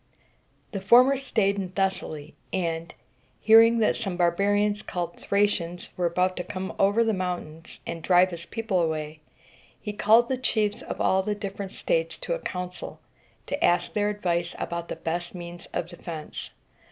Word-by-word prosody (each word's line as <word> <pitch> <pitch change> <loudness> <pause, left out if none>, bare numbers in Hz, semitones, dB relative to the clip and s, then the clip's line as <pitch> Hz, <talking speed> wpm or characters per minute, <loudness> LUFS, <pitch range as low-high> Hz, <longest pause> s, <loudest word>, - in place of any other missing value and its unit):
The 195 -4 -4
former 250 +7 +6
staid 215 -7 0
in 190 -2 -3
Thessaly; 165 -6 -2 0.2
and, 165 -2 -2 0.5
hearing 225 +1 +7
that 215 - +3
some 195 -6 -3
barbarians 205 +4 +2
called 175 -1 -4
Thra´cians 190 -4 0
were 175 -1 +1
about 180 +2 +1
to 180 - -2
come 190 +1 -5
over 205 +4 +4
the 225 -1 +1
mountains 175 -4 -5
and 170 -1 -5
drive 180 +2 +4
his 170 0 -7
people 220 -6 -1
away, 155 -1 -2 0.6
he 210 - -5
called 220 +3 +5
the 260 - -1
chiefs 215 -4 0
of - - -6
all 190 - +3
the 210 +2 -2
different 200 -1 -5
states - - -1
to - - -3
a - - -2
council, 180 - -6 0.5
to 285 - -3
ask 175 - +2
their 205 0 +1
advice 175 -4 -1
about 170 0 -4
the - - -4
best 175 +2 -4
means 175 0 -8
of 170 - -2
defense. 170 -3 -7
190 Hz, 165 wpm, -26 LUFS, 170-210 Hz, 0.6 s, hearing